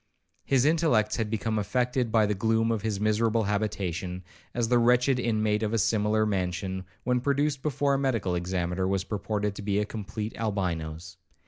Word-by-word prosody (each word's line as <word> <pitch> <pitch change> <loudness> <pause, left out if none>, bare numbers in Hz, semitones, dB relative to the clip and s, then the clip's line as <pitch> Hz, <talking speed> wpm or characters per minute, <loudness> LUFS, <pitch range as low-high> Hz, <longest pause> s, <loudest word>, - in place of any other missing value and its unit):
His 135 -1 +2
intellects 150 -9 +2
had 110 -2 -1
become 110 0 -1
affected 125 +2 0
by 110 -1 +4
the 105 - 0
gloom 115 +3 +1
of 110 -3 -1
his 105 -2 -2
miserable 110 +1 +2
habitation, 95 -3 -2 0.3
as 120 -2 -1
the 120 +1 +4
wretched 125 +2 +3
inmate 110 -3 +1
of 110 0 -1
a - - +2
similar 110 +1 +2
mansion, 95 -1 -2 0.2
when 125 0 +1
produced 140 +1 0
before 140 -1 +1
a 135 - +1
medical 115 -9 0
examiner, 90 +1 -1
was 95 0 0
reported 105 0 -1
to 100 - -8
be 100 0 0
a 105 - +1
complete 105 +1 -5
Albinos. 90 -5 -3
110 Hz, 175 wpm, -27 LUFS, 95-120 Hz, 0.3 s, by